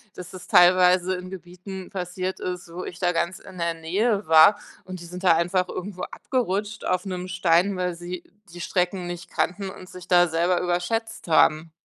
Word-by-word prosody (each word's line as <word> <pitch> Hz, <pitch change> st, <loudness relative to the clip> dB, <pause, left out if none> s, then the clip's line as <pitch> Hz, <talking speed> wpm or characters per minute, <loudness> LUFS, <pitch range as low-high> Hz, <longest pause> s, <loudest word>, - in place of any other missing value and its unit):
dass 180 Hz, -1 st, -9 dB
das 185 Hz, -1 st, -11 dB
teilweise 180 Hz, +1 st, +5 dB
in 180 Hz, 0 st, -7 dB
Gebieten 185 Hz, +1 st, -9 dB
passiert 185 Hz, 0 st, -4 dB
ist, 180 Hz, -1 st, -5 dB
wo 180 Hz, -, -5 dB
ich 180 Hz, -, -8 dB
da 180 Hz, -1 st, +1 dB
ganz 170 Hz, +2 st, -1 dB
in 190 Hz, -1 st, -13 dB
der 170 Hz, -1 st, -1 dB
Nähe 195 Hz, +5 st, -1 dB
war, 160 Hz, +6 st, +7 dB, 0.2 s
und 185 Hz, -1 st, -8 dB
die 170 Hz, -, -10 dB
sind 180 Hz, +2 st, -9 dB
da 170 Hz, -3 st, +5 dB
einfach 180 Hz, +2 st, 0 dB
irgendwo 185 Hz, 0 st, -6 dB
abgerutscht 210 Hz, -4 st, -3 dB
auf 185 Hz, +1 st, -1 dB
'nem 185 Hz, -1 st, -5 dB
Stein, 180 Hz, +2 st, +2 dB
weil 180 Hz, -1 st, -2 dB
sie 175 Hz, 0 st, -7 dB, 0.3 s
die 175 Hz, -, -9 dB
Strecken 180 Hz, 0 st, -1 dB
nicht 175 Hz, +1 st, -7 dB
kannten 195 Hz, +2 st, -2 dB
und 185 Hz, -1 st, -11 dB
sich 180 Hz, -1 st, -12 dB
da 175 Hz, -1 st, +5 dB
selber 170 Hz, +2 st, +1 dB
überschätzt 180 Hz, +4 st, -2 dB
haben. 155 Hz, 0 st, +3 dB
180 Hz, 185 wpm, -24 LUFS, 175-185 Hz, 0.3 s, war